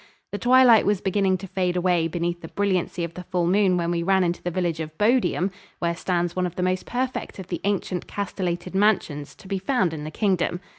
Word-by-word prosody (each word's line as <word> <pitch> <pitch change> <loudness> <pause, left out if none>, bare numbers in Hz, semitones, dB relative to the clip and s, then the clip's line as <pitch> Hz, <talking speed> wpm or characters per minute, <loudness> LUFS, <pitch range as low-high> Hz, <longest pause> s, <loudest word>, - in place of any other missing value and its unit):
The 205 - -4
twilight 245 -2 +6
was 205 -2 +2
beginning 190 -1 +1
to 195 +2 -8
fade 180 -1 -1
away 175 -2 +2
beneath 175 +1 -2
the 165 - -7
brilliancy 185 -2 -1
of 170 0 -4
the 180 - -7
full 180 -1 -1
moon 185 0 +3
when 170 0 0
we 170 -1 0
ran 190 +2 +3
into 175 0 -1
the 175 - -2
village 175 -2 -1
of 155 0 -6
Bodiam, 210 -4 +2 0.3
where 170 -1 -1
stands 175 -1 -1
one 185 -1 +1
of 175 - -9
the 180 - -2
most 185 0 -1
perfect 255 +1 -3
of 190 -2 -9
the 175 - -3
ancient 195 -3 -1
castellated 180 -3 -3
mansions 190 -8 +1
to - - -15
be 195 0 -2
found 190 - +1
in 150 -2 -5
the 155 - -5
Kingdom. 180 -1 0
180 Hz, 225 wpm, -24 LUFS, 170-195 Hz, 0.3 s, twilight